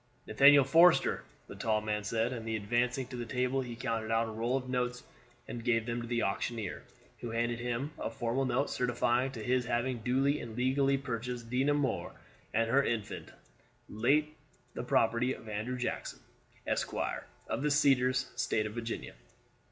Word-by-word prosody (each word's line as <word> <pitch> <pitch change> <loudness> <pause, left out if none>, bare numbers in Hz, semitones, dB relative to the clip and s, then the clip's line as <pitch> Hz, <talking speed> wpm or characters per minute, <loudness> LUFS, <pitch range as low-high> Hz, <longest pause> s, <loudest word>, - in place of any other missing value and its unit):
"Nathaniel 140 0 +7
Forster," 165 +6 +5 0.2
the - - -10
tall 110 -1 +1
man 105 -1 -2
said; 115 +3 0
and 115 -2 -5
advancing 120 +4 0
to 130 - -7
the 120 - -3
table 125 +2 0
he 120 -2 -6
counted 115 -2 -2
out 115 0 +2
a - - -5
roll 115 +4 0
of 130 -1 -5
notes 125 -1 -1 0.4
and 115 - -6
gave 115 -2 +2
them 120 0 -2
to 120 - -6
the 120 0 0
auctioneer, 105 +1 -2 0.4
who 120 - -5
handed 115 +1 -1
to - - -6
him 125 +5 -2
a - - -2
formal 120 +3 -1
note 130 +2 0
certifying 125 +1 +1
to 110 -4 -6
his 125 +1 +1
having 120 +1 -1
duly 135 +5 +1
and 115 -1 -8
legally 135 +2 +2
purchased 120 -2 -5
Dinah 135 +3 +2
Moore 140 -4 -1 0.4
and 115 +1 +1
her 135 +4 +4
infant, 110 -5 -3 0.6
late 145 +8 +1 0.4
the - - -4
property 115 +3 +2
of 115 - -13
Andrew 110 +4 -3
Jackson, 125 - -3 0.5
Esquire, - - -2 0.2
of - - -2
the 150 - +1
Cedars, 130 -3 +3
State 120 -3 0
of 105 - -5
Virginia. 115 0 -5
120 Hz, 175 wpm, -32 LUFS, 115-130 Hz, 0.6 s, Nathaniel